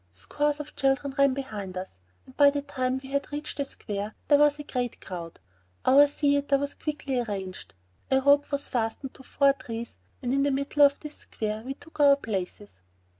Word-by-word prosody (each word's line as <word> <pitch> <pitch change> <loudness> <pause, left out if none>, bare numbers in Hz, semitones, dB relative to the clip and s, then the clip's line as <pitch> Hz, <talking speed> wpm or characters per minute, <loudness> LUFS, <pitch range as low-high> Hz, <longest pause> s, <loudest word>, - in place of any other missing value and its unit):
Scores 290 - -1
of 300 0 -8
children 270 0 +1
ran 275 -2 +4
behind 205 -9 -5
us, 185 - -7 0.3
and 260 - -17
by 285 -1 +7
the 285 0 -2
time 255 -2 -1
we 265 - -9
had 280 +1 -2
reached 295 0 -5
the 280 - -1
square, 205 -4 -6
there 290 -1 +6
was 295 0 +4
a 295 - -7
great 250 -4 -3
crowd. 170 -3 -8 0.5
Our 280 +3 +7
theater 285 -1 +1
was 285 +1 -3
quickly 290 -4 -3
arranged. 195 - -5 0.3
A 265 - +4
rope 285 +2 +4
was 280 0 -1
fastened 240 +3 -2
to - - -14
four 275 +1 +3
trees 230 -3 -7 0.3
and 245 +1 0
in 275 - +2
the 285 - +2
middle 280 +2 -1
of 280 0 +5
this 300 -1 -9
square 215 0 -4
we 265 +4 -6
took 320 +2 -16
our 285 -1 +7
places. 180 - -5
270 Hz, 195 wpm, -27 LUFS, 225-285 Hz, 0.5 s, by